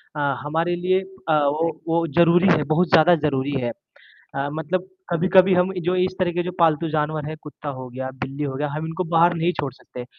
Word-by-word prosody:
अ, - - -4 0.2
हमारे 165 +4 -1
लिए 185 +2 +1 0.3
अ, - - +4
वो 160 +3 0 0.2
वो 165 0 +1
ज़रूरी 175 +2 +5
है 150 - 0
बहुत 155 +5 +1
ज़्यादा 175 +2 +6
ज़रूरी 145 -3 -1
है। 120 - -1 0.7
अ, 140 +1 -1
मतलब 175 +4 -3 0.2
कभी-कभी 185 +2 +4
हम 180 +1 +2
जो 180 - +2
इस 185 0 +1
तरह 180 -2 +1
के 175 0 -1
जो 180 - -4
पालतू 165 0 +3
जानवर 155 0 -1
है, 155 - -5
कुत्ता 150 -1 -8
हो 130 - -7
गया, 130 +1 -5
बिल्ली 140 +3 -5
हो 135 -2 -3
गया, 150 +2 -2
हम 155 - -4
इनको 165 +3 -3
बाहर 170 +1 +5
नहीं 170 +1 +1
छोड़ 140 -2 -2
सकते, 125 -1 -10
165 Hz, 210 wpm, -22 LUFS, 150-175 Hz, 0.7 s, ज़्यादा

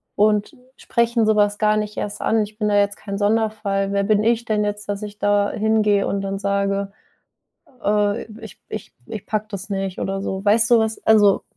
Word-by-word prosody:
und 210 0 +2 0.2
sprechen 235 -1 +1
so 220 - +3
was 205 0 +2
gar 215 0 +3
nicht 210 0 -3
erst 205 0 -4
an. 220 0 +2
Ich 210 +1 -10
bin 210 -1 +1
da 205 - +2
jetzt 200 0 +2
kein 200 -1 -6
Sonderfall. 205 -2 0
Wer 200 - +1
bin 210 +1 +2
ich 230 +1 +1
denn 215 -1 0
jetzt, 205 0 -4
dass 205 +1 -3
ich 210 0 -8
da 205 0 +2
hingehe 215 -2 +2
und 195 - -1
dann 195 0 -3
sage: 200 0 -1 0.9
„Öh 205 +1 +1 0.2
ich - - -11
ich - - -7
ich 215 -3 -7
packe 215 0 -2
das 200 0 -6
nicht 195 -2 -3
oder 195 0 -2
so? 190 0 -4
Weißt 220 +3 +3
du 240 - +7
was 220 -1 -2
also 205 -3 +5
205 Hz, 200 wpm, -21 LUFS, 200-215 Hz, 0.9 s, du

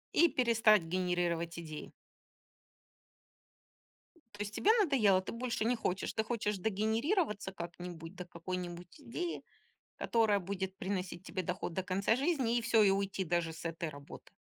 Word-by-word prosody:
И 340 - +6
перестать 225 - +4
генерировать 170 -1 -1
идеи. 155 -2 -7 2.5
То 205 - -5
есть 205 0 -4
тебе 425 - +4
надоело, 215 - +4
ты - - -6
больше 235 -1 -2
не 240 +1 +2
хочешь, 190 -3 -1
ты 220 - 0
хочешь 210 -3 -1
догенерироваться 220 - 0
как-нибудь 170 -1 -7
до 180 - -6
какой-нибудь 175 - -6
идеи, 315 +7 -4 0.5
которая 220 -3 +3
будет 190 0 -3
приносить 185 -2 -3
тебе 185 0 -3
доход 180 -1 -3
до 190 - -1
конца 195 +4 +1
жизни, 265 -5 +1
и 235 - +1
всё, 225 -1 +4
и 205 - +6
уйти 195 0 0
даже 170 -1 0
с 160 +1 -7
этой 165 -1 -3
работы? 140 -1 -12
195 Hz, 145 wpm, -33 LUFS, 175-225 Hz, 2.5 s, И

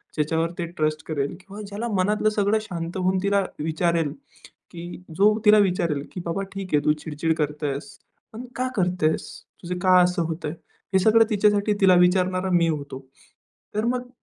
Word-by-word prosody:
ज्याच्यावर 160 +2 0
ती 175 - -2
ट्रस्ट 155 0 0
करेल 145 -3 -2
किंवा 195 +2 -10
ज्याला 205 +4 -4
मनातलं 210 +3 +2
सगळं 210 0 +1
शांत 170 -4 -5
होऊन 185 0 +1
तिला 200 0 +2 0.2
विचारेल, 160 -1 0 0.6
की 175 +1 -9
जो 210 +2 +4
तिला 210 0 +7
विचारेल, 180 -7 +1
की - - -6
बाबा 170 +4 -2
"ठीक 195 -3 -6
आहे, 145 -1 +3
तू 150 - +4
चिड-चिड 160 +1 -1
करतेस, 145 -2 -3 0.4
पण 235 +3 -7
का 255 +1 -1
करतेस? 180 -4 0 0.3
तुझं 180 +1 -4
का 185 -1 +6
असं 180 -1 +1
होतंय?" 160 -2 -4 0.4
हे 190 - +5
सगळं 225 +3 +5
तिच्यासाठी 210 -1 +2
तिला 190 -2 +6
विचारणारा 185 +1 +1
मी 170 -1 +4
होतो. 145 -4 -4 0.8
तर 215 +2 0
मग 245 0 -2
180 Hz, 165 wpm, -24 LUFS, 160-200 Hz, 0.8 s, तिला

